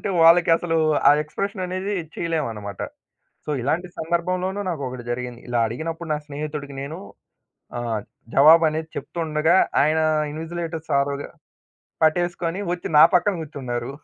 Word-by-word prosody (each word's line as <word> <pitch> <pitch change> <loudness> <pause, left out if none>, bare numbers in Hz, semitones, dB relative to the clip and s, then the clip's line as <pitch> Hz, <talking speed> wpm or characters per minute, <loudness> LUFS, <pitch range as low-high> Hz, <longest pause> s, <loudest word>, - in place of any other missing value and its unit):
చూపిస్తుంటే, - - -3
వాళ్ళకసలు 165 0 +5 0.3
ఆ - - +9
ఎక్స్‌ప్రెషన్ 195 +6 -4
అనేది 185 +3 -3 0.2
చేయలేమన్నమాట. 115 - -3 0.7
సో 150 - -3
ఇలాంటి 160 +8 -1
సందర్భంలోను 180 +4 -1
నాకొకటి 130 -7 -4
జరిగింది. 125 0 -5
ఇలా 120 -1 0
అడిగినప్పుడు 165 +8 -5
నా - - 0
స్నేహితుడికి 145 -1 -5
నేను 140 +4 -6 0.8
ఆహ్, 115 -3 -2 0.3
జవాబనేది 160 +2 +5
చెప్తుండగా 160 0 0 0.3
ఆయన 155 +2 +2 0.3
ఇన్విజిలేటర్స్ 165 +1 -5
ఆరోజు 140 0 -2 0.8
పట్టేసుకొని 175 +2 +1
ఒచ్చి 175 - -4
నా - - +10
పక్కన 195 +3 +3
గూర్చున్నారు. 125 -6 -5
160 Hz, 115 wpm, -23 LUFS, 140-170 Hz, 0.8 s, నా